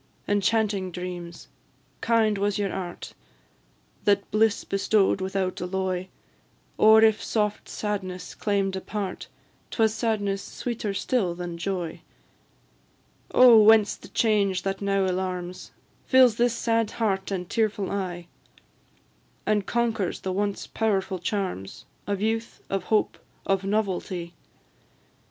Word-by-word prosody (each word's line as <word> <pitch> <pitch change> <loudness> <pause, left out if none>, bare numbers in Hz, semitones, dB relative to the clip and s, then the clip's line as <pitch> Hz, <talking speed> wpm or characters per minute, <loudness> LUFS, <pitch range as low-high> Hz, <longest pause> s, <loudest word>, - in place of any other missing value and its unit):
Enchanting 205 -1 +1
dreams! 175 -3 -7 0.5
kind 220 -3 +2
was 205 0 0
your 200 -2 -1
art 180 -2 -6 0.9
That 200 -1 +2
bliss 215 0 +2
bestow'd 195 0 +1
without 190 -1 -2
alloy; 185 0 -2 0.7
Or 220 +1 +7
if 220 -1 +4
soft 210 -2 -1
sadness 185 -4 -4
claim'd 195 -2 0
a 190 - -4
part, 200 -3 -5 0.4
'Twas 220 -2 +2
sadness 215 -3 -1
sweeter 225 -4 -4
still 195 -7 0
than 175 -1 -5
joy. 175 -3 -3 1.3
Oh! 240 -3 +8
whence 215 -1 +6
the - - -14
change 200 -4 +1
that 195 0 -2
now 195 -1 +1
alarms, 180 -1 -3 0.4
Fills 255 -4 +5
this 240 -1 +2
sad 230 -2 +1
heart 195 -4 0
and 185 -3 -3
tearful 215 -3 -1
eye, 180 -3 -3 1.2
And 210 -2 +1
conquers 230 -5 -1
the 190 - -3
once 200 +1 -2
powerful 195 -4 -1
charms 180 - -4 0.2
Of 200 -1 -2
youth, 225 +1 -2
of 195 -1 -1
hope, 215 -1 +1 0.3
of 195 0 +1
novelty? 190 -4 -2
200 Hz, 120 wpm, -26 LUFS, 185-220 Hz, 1.3 s, Oh